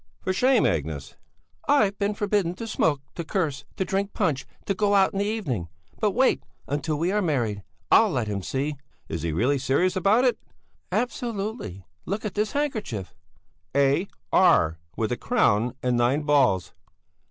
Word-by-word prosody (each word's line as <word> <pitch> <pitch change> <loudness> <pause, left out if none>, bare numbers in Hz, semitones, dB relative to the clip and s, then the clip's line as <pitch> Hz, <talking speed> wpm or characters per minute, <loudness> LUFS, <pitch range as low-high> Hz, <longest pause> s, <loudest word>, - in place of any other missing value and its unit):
"For 185 - 0
shame, 250 +3 +4
Agnes!" 75 -2 -2 0.5
"I've 215 -9 +4
been 205 0 0
forbidden 200 -4 0
to 230 - -6
smoke, 155 -10 +1
to 170 - -4
curse, 155 -6 -2
to 190 - -1
drink 195 +1 -1
punch, 140 -10 0 0.2
to 200 - +1
go 205 +1 +2
out 195 -1 +4
in 195 - -2
the 200 - +1
evening! 155 - -2 0.3
But 210 -2 +1
wait 260 +2 +3 0.3
until 150 +2 -1
we 170 +4 0
are 210 +1 +1
married! 120 - 0 0.3
I'll 220 - +7
let 125 - -1
him 100 -2 -2
see!" 140 +8 -2 0.3
"Is 80 0 -3
he 85 0 -1
really 125 - +1
serious 160 +8 +1
about 200 +6 +3
it?" 250 - +2 0.5
"Absolutely! 215 - -3 0.2
Look 205 +4 -3
at 205 - -3
this 210 0 -1
handkerchief!" 220 - -2 0.6
"A. 140 +6 +3 0.3
R. 80 - +4 0.2
with 110 +1 -1
a 120 - 0
crown 120 - +2
and 125 -1 +2
nine 125 +5 +2
balls." 135 -11 +2
170 Hz, 165 wpm, -25 LUFS, 125-205 Hz, 0.6 s, I'll